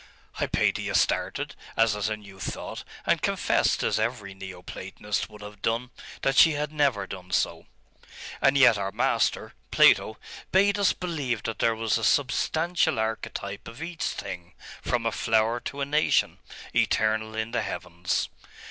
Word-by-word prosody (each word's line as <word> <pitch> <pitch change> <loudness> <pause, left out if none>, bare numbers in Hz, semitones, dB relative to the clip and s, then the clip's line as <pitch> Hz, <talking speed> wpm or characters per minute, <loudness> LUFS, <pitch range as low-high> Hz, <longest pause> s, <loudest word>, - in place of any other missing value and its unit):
Hypatia - - 0
started, - - +1 0.2
as 115 -2 +4
at 105 0 -1
a 110 - -2
new 100 -2 -14
thought, 95 - -5 0.2
and - - +2
confessed - - +1
as - - +1
every 110 -3 -2
Neo 95 -2 -9
Platonist 100 +3 -4
would 105 -1 -12
have 105 -1 -11
done 120 +3 -1 0.3
that 135 - +2
she 160 +3 +7
had 150 0 -2
never 140 -8 +1
done 90 -1 -9
so. 90 - 0 0.7
'And 135 0 +4
yet 120 -6 +6
our 100 0 -2
master, - - 0 0.2
Plato, 110 - +5 0.3
bade 200 +2 +4
us 200 - +4
believe 145 - -3
that 115 - -4
there 115 -1 +2
was 115 0 0
a - - -6
substantial 160 - +2
archetype 110 -2 -3
of 115 +7 -8
each 170 -2 -5
thing, 90 -2 -5 0.3
from 120 -2 -1
a 115 - +2
flower 110 +2 +1
to 140 +3 -6
a - - +1
nation, 150 +2 +2 0.3
eternal 110 0 +1
in 110 +1 -2
the 125 - 0
heavens. 90 -1 -2
115 Hz, 155 wpm, -27 LUFS, 105-135 Hz, 0.7 s, she